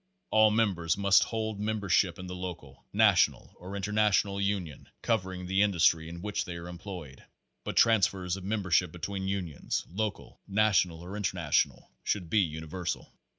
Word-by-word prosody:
All 110 0 +6
members 95 -7 +1
must 100 0 +5
hold 110 -2 -3
membership 100 -4 +1
in 95 - -7
the 90 - -6
local, 90 -7 -8
na - - +6
tional - - +1
or 95 +2 -8
international 100 0 +1
union 95 -7 -3
covering 95 -5 -1
the 95 +2 +1
industry 85 -5 +3
in 85 +1 -8
which 105 0 -1
they 85 - -7
are 85 0 -7
employed, 90 -6 -9 0.4
but - - -5
transfers 95 -5 +3
of 95 - -8
membership 95 -4 +1
between 95 +3 -4
unions, 90 -6 -3
local, 105 +4 -4
national 95 -5 +2
or 90 +3 -7
international, 90 -6 0
should 90 -6 -2
be 110 - +4
universal. 80 +1 -4
95 Hz, 150 wpm, -29 LUFS, 85-105 Hz, 0.4 s, All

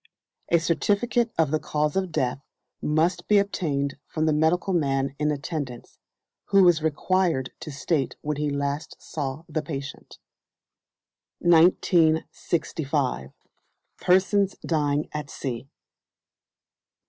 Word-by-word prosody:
A 170 - +5
certificate 210 +8 +1
of 160 -3 +2
the 155 - +1
cause 150 0 -1
of 190 -2 -1
death 130 -4 -1 0.4
must 165 +4 +1
be 210 - +5
obtained 145 -9 -1
from 155 0 -1
the 155 - +3
medical 160 +5 +2
man 135 -4 0
in 150 0 +1
attendance, 145 -4 -5 0.5
who 195 -2 +5
is 170 -3 +4
required 160 -2 0
to - - -7
state 140 -1 -1
when 150 -1 -2
he 150 0 0
last 140 +2 -3
saw 145 0 -5
the 155 -1 -2
patient. 140 -3 -7 1.2
1965. 160 - +2 0.7
Persons 195 +2 +3
dying 150 -2 0
at 150 -1 -4
Sea. 130 0 -5
155 Hz, 110 wpm, -25 LUFS, 140-175 Hz, 1.2 s, A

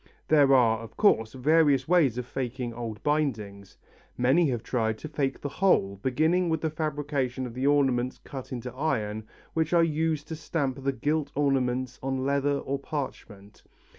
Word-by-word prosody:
There 145 -3 +5
are, 115 -3 +4
of 115 -1 -11
course, 110 - +3
various 140 0 +3
ways 155 -9 +3
of 125 - -3
faking 125 -1 -4
old 115 -2 -6
bindings. 110 -10 -2 0.4
Many 140 +6 +3
have 120 -3 -2
tried 110 -3 -1
to 155 - -7
fake 140 -3 -2
the - - -3
whole, 100 - +1
beginning 160 - +1
with 160 -1 0
the 160 - -1
fabrication 145 -4 -2
of 120 - -7
the 130 +3 -1
ornaments 130 -3 +2
cut 135 -2 -9
in 120 -3 -5
iron 110 -7 -2 0.3
which 160 +1 0
are 170 -1 +5
used 155 -1 0
to 160 - -4
stamp 145 -4 -2
the 135 - +1
gilt 145 +3 -1
ornaments 130 -3 0
on 130 0 -2
leather 140 0 +1
or 140 0 -3
parchment. 110 -8 -7
135 Hz, 165 wpm, -27 LUFS, 120-150 Hz, 0.4 s, There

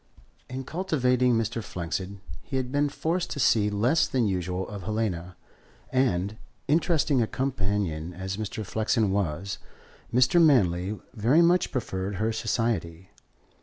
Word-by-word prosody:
In 130 +1 -4
cultivating 125 -6 +1
Mr. 115 0 -1
Flexen 95 +2 -4 0.2
he 135 - -4
had 130 -1 -2
been 145 +1 +2
forced 170 +5 -1
to - - -4
see 105 -5 +4
less 120 +10 +2
than 125 -3 +1
usual 90 -1 -2
of 105 -2 -7
Helena, 95 -4 -2 0.6
and, 105 -6 +1 0.3
interesting 150 -3 +2
a 110 - +1
companion 100 - -2
as 95 +2 -5
Mr. 110 0 -4
Flexen 110 0 +1
was, 95 0 -2 0.5
Mr. 125 +8 +4
Manley 100 - +3
very 125 +11 +4
much 175 +2 +3
preferred 100 -5 -3
her 110 +3 0
society. 110 -7 -2
110 Hz, 130 wpm, -27 LUFS, 95-130 Hz, 0.6 s, see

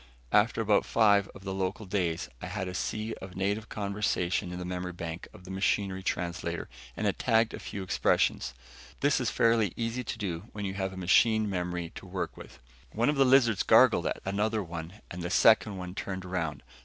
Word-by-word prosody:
After 110 +2 +3
about 105 -2 +3
five 100 -3 +4
of 95 - -12
the 95 -1 -3
local 95 +3 -2
days, 90 -4 -1
I - - -5
had 100 -3 -3
a 90 - -5
sea 110 - -2
of 95 -1 -9
native 100 +4 -1
conversation 100 -4 -1
in 90 - -5
the 90 - -5
memory 90 0 -4
bank 85 0 -6
of 90 - -15
the 95 - -9
machine 95 0 0
translator 85 -2 -3 0.3
and - - -2
had - - 0
tagged 115 0 +3
a - - -6
few 100 - -6
expressions. 95 - +1 0.5
This 145 -1 +3
is 125 -3 0
fairly 115 -6 +2
easy 115 +2 -2
to 120 - -5
do 95 -4 -4
when 105 -1 -4
you 95 - -2
have 95 -1 -2
a 95 - -9
machine 110 +4 +4
memory 90 -3 -3
to - - -10
work - - -4
with. - - -12 0.4
One 115 +4 +2
of 150 - +2
the 135 -1 +5
lizards 125 -6 +5
gargled - - +5
at - - -2
another 105 +2 0
one 85 +3 -8
and 90 - -5
the 85 - -3
second 105 0 +4
one 90 -1 -6
turned 95 -1 -5
around. 85 -4 -3
95 Hz, 205 wpm, -29 LUFS, 90-110 Hz, 0.5 s, the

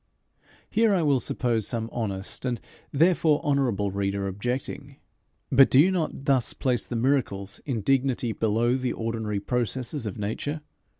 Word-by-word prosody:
Here 220 -2 +3
I 175 - +1
will 140 -3 +3
suppose 115 -4 -1
some 115 -2 -2
honest, 100 -4 -3
and 125 -3 -1 0.3
therefore 160 0 +3
honourable, 125 -9 +1
reader 100 0 -1
objecting: 120 +7 -4 0.6
But 135 +1 +7
do 130 - +5
you 180 +6 +6
not 160 -6 -2
thus 135 -4 +2
place 125 -3 -1
the 120 - -4
miracles 115 -6 -1
in 120 -6 -1
dignity 130 0 +1
below 115 +3 +1
the 130 -1 -2
ordinary 110 -2 -2
processes 125 +3 -2
of 100 - -5
nature? 115 +9 -3
125 Hz, 145 wpm, -26 LUFS, 110-140 Hz, 0.6 s, But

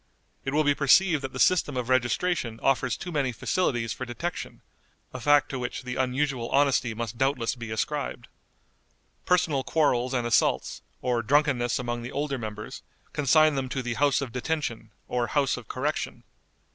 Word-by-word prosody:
It 135 - -1
will 155 +2 +2
be 145 -1 +3
perceived 155 +3 +4
that 135 -1 -5
the 130 - -7
system 150 -6 +3
of 125 -2 -2
registration 125 - 0
offers 135 -3 +2
too 180 - -6
many 140 -5 0
facilities 120 - -1
for - - -6
detection, 165 +8 -5 0.5
a 130 - -5
fact 145 +3 +4
to 135 - -4
which 125 +1 -4
the 125 0 -4
unusual 130 -1 -1
honesty 135 -5 +2
must 115 0 -5
doubtless 135 -3 +1
be 120 -3 -8
ascribed. 120 +2 -3 1.0
Personal 160 -7 +2
quarrels 130 -5 +1
and 120 -2 0
assaults, 120 - +1 0.2
or 120 -2 +1
drunkenness 125 -1 +2
among 120 -1 -3
the 120 - -6
older 140 -2 -2
members, 105 -1 -7 0.3
consign 155 +2 +4
them 135 -2 -2
to 130 0 -3
the 120 -1 -2
House 140 +3 +2
of 135 -4 -4
Detention 125 -3 -3 0.2
or 120 -1 -1
House 140 +1 +1
of 125 -3 -10
Correction. 145 +4 -3
130 Hz, 170 wpm, -27 LUFS, 120-145 Hz, 1.0 s, perceived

